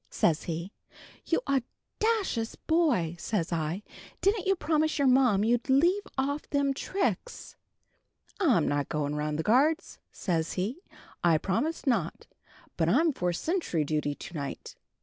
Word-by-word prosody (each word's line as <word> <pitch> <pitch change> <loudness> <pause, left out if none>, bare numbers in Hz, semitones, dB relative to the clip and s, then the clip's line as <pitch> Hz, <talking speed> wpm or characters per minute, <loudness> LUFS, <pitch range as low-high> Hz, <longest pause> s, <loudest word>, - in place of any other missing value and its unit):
says 160 -2 +1
he. 170 +3 -4 0.6
'You - - +2
awdacious 275 - -1
boy!' 280 - +1
says 175 -2 -2
I, 165 +5 -2 0.4
'Didn't 395 0 +1
you 390 - +4
promise 315 -2 +1
your 280 -2 +3
ma 255 -4 +5
you'd 230 +6 +1
leave 345 +10 +3
off 285 +3 -1
them 280 -1 +1
tricks?' 385 - -3 0.8
'I'm 255 - +3
not 145 -1 0
going 150 -1 -1
round 150 0 -2
the 160 - -1
guards,' 295 - +2
says 165 -4 -1
he; 215 - -3 0.4
'I 170 -2 +5
promised 280 - -1
not. 260 -4 0 0.5
But - - +2
I'm 325 -2 +3
for 180 -7 -1
sentry 245 - -1
duty 150 -1 -1
to 175 - -10
night.' 145 -4 -6
240 Hz, 140 wpm, -29 LUFS, -, 0.8 s, ma